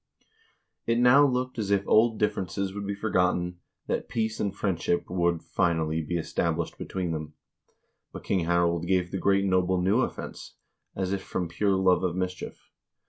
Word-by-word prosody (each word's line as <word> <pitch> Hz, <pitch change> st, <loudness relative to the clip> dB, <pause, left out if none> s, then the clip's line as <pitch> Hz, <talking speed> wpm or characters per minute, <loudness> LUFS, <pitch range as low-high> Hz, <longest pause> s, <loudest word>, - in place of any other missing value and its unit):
It 115 Hz, 0 st, +2 dB
now 125 Hz, +4 st, +6 dB
looked 125 Hz, -1 st, -2 dB
as 105 Hz, -2 st, -2 dB
if 100 Hz, -1 st, +1 dB
old 110 Hz, 0 st, +4 dB
differences 100 Hz, -2 st, -1 dB
would 100 Hz, 0 st, -5 dB
be 100 Hz, -, -2 dB
for 110 Hz, +2 st, -3 dB
gotten, 90 Hz, -1 st, +1 dB, 0.3 s
that -, -, -3 dB
peace 110 Hz, -1 st, -2 dB
and 100 Hz, -, 0 dB
friendship 95 Hz, -3 st, -1 dB
would, 85 Hz, -2 st, 0 dB
finally, 80 Hz, -2 st, 0 dB
be 85 Hz, +3 st, -2 dB
established 80 Hz, -, -2 dB
be -, -, -5 dB
tween 90 Hz, -3 st, -3 dB
them. 75 Hz, -1 st, -5 dB, 0.8 s
But -, -, -9 dB
King 95 Hz, -4 st, 0 dB
Harald 85 Hz, 0 st, +1 dB
gave 90 Hz, -1 st, +1 dB
the 95 Hz, -, -2 dB
great 100 Hz, +1 st, +2 dB
noble 95 Hz, -1 st, +2 dB
new 95 Hz, +6 st, +2 dB
offense, -, -, -5 dB, 0.4 s
as 95 Hz, 0 st, -1 dB
if 100 Hz, -, -2 dB
from 90 Hz, -2 st, -3 dB
pure 95 Hz, +4 st, +1 dB
love 95 Hz, -1 st, +3 dB
of 90 Hz, -2 st, 0 dB
mischief. 90 Hz, 0 st, -5 dB
95 Hz, 175 wpm, -27 LUFS, 85-100 Hz, 0.8 s, now